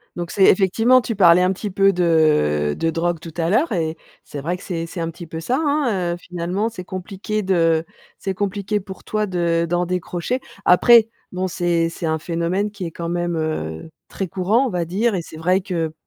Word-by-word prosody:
Donc, 175 -1 -5
c'est 195 - +2
effectivement 225 +7 +4
tu 230 -1 -3
parlais 180 -3 +6
un 180 +1 +3
petit 205 +2 -5
peu 195 +1 +4
de 155 - +2
de 165 - 0
drogue 165 +1 -1
tout 165 0 -10
à 165 0 0
l'heure 250 - +2
et 165 -4 -1 0.3
c'est 145 - -7
vrai 170 +5 -2
que 185 - -14
c'est 165 -3 -3
c'est 170 +1 -8
un 165 - -2
petit 165 +1 -9
peu 160 +1 -6
ça, 245 - -1
hein. 240 - 0
Heu, - - -5
finalement, 180 +5 -3
c'est 200 -5 -8
compliqué 195 +3 -4
de 165 -3 +2 0.3
c'est 195 - -3
compliqué 200 +1 -2
pour 190 -1 -10
toi 215 0 -1
de 170 -3 0
d'en 175 +1 +1
décrocher. 180 +6 -2 0.3
Après, 225 +5 +6 0.2
bon, 185 0 -2
c'est 175 -2 0
c'est 170 - -6
un 160 0 0
phénomène 170 +5 -1
qui 200 -3 -6
est 165 - -5
quand 170 +1 -5
même, 175 0 -1
heu, 155 - -3 0.2
très 195 - -4
courant, 195 +9 +1
on - - -2
va 175 -5 -2
dire, 205 +6 0
et 180 - -1
c'est 160 - -11
vrai 180 +4 +2
que 170 -4 -3
180 Hz, 215 wpm, -21 LUFS, 165-195 Hz, 0.3 s, parlais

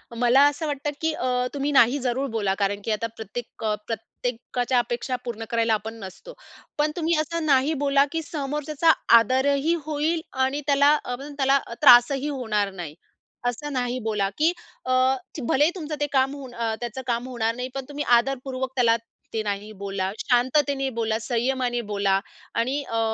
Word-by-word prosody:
मला 245 +3 +4
असं 290 +3 -2
वाटतं 290 0 -2
की 320 0 +1
अ, 250 -3 0
तुम्ही 285 +1 -1
नाही 260 0 +5
जरूर 260 +2 -1
बोला, 205 -4 0
कारण 200 0 0
की 225 - -1
आता 215 +2 -1
प्रत्येक 225 +2 -8
अ, 215 -1 +1
प्रत्येकाच्या 245 +2 -3
अपेक्षा 240 +2 -2
पूर्ण 230 -2 -5
करायला 230 -1 +2
आपण 220 +1 -2
नसतो. 190 - -10 0.4
पण 300 +1 +2
तुम्ही 335 0 +1
असं 320 +1 -2
नाही 280 +2 +3
बोला, 280 -1 +4
की 325 0 -1
समोरच्याचा 300 +1 0 0.3
आदर 255 +4 +2
ही 305 +5 +1
होईल 310 +2 0 0.2
आणि 285 +3 -2
त्याला 285 +1 +5
अ, 245 - -3 0.2
त्याला 270 0 +4
अ, 235 - -7
त्रासही 270 +1 +7
होणार 210 -8 -1
नाही. 170 -5 -7 0.5
असं 290 +4 -3
नाही 250 0 -1
बोला, 210 -3 0
की 315 +3 +3 0.3
अ, 255 - -1 0.6
भलेही 295 +5 +3
तुमचं 310 -4 -4
ते 290 - 0
काम 270 0 +3
होऊन 265 -3 -9
अ, 230 -1 -1
त्याचं 240 +2 -5
काम 240 +1 -1
होणार 230 -3 -1
नाही, 250 +1 -4
पण 270 -1 -4
तुम्ही 290 0 -3 0.2
आदरपूर्वक 260 0 -3
त्याला 235 -3 +4 0.4
ते 220 - 0
नाही 205 +1 -4
बोला. 195 -1 -2
शांततेने 270 +2 +1
बोला, 220 -1 0
संयमाने 245 0 0
बोला 200 -1 +2 0.4
आणि 260 +5 0
अ, 225 -3 -3
255 Hz, 170 wpm, -24 LUFS, 230-285 Hz, 0.6 s, त्रासही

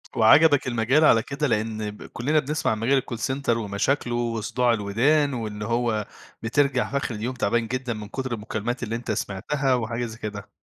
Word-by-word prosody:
وعجبك 145 +5 +6
المجال 125 +6 +3
على 115 -5 +5
كده؟ 145 +1 -2
لإن 110 -2 -1
ب 105 - -12
كُلّنا 150 +6 0
بنسمع 150 -1 -1
عن 110 - -2
مجال 135 +3 +2
الcall 120 - -6
center 130 +4 -3
ومشاكله 115 +4 -1
وصداع 120 +1 0
الودان، 130 +8 +2
وإن 105 -3 -5
هو 115 -1 0 0.4
بترجع 130 +2 +1
في 140 - 0
آخر 125 -4 -2
اليوم 115 +5 -3
تعبان 115 0 0
جدًا 125 0 -2
من 105 -1 -7
كُتر 130 +2 -4
المكالمات 115 +3 -3
اللي 115 0 -2
أنت 120 - -4
سمعتها، 135 +8 -1
وحاجة 120 0 -2
زي 110 -1 -8
كده. 100 -2 -6
120 Hz, 180 wpm, -24 LUFS, 110-135 Hz, 0.4 s, وعجبك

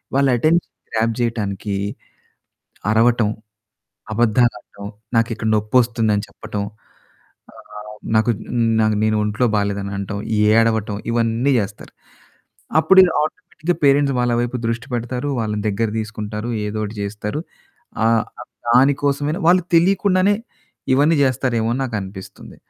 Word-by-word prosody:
వాళ్ళ 140 0 +3
attention 165 +7 +1 0.2
grab 115 0 +1
చేయటానికి 105 -4 -2 1.2
అరవటం, 115 0 +3 0.8
అబద్ధాలాడటం, 110 -2 0 0.3
నాకిక్కడ 115 -1 0
నొప్పొస్తుందని 110 -1 +1
చెప్పటం, 100 0 -6 0.9
ఆహ్, 105 0 -11 0.2
నాకు 110 +2 +3 0.7
నేను 110 0 +2
ఒంట్లో 105 +4 0
బాలేదని 100 -1 -2
అనటం, 100 +1 -4 0.4
ఏడవటం 110 -2 +2 0.2
ఇవన్నీ 115 +3 +1
చేస్తారు. 100 0 -7 0.9
అప్పుడు 190 +3 +6 0.2
ఆటోమేటిక్‌గా 165 0 -3
పేరెంట్స్ 140 0 +4
వాళ్ళ 120 0 +1
వైపు 120 +1 -2
దృష్టి 115 +2 -2
పెడతారు. 125 +3 -3
వాళ్ళని 105 -2 -2
దగ్గర 105 +2 0
తీసుకుంటారు. 105 +1 -5 0.2
ఏదో 105 +1 -4
ఒకటి 105 +1 -7
చేస్తారు. 105 +6 -4 0.7
ఆహ్, 115 0 +3 0.4
దాని 130 +4 +5
కోసమే 145 +1 0 0.2
వాళ్ళు 180 0 +4
తెలియకుండానే 190 +2 +3 0.6
ఇవన్నీ 150 +4 +3
చేస్తారేమో 120 -3 0
అని 130 - -2
నాకనిపిస్తుంది. 100 -6 -7
115 Hz, 105 wpm, -20 LUFS, 105-130 Hz, 1.2 s, అప్పుడు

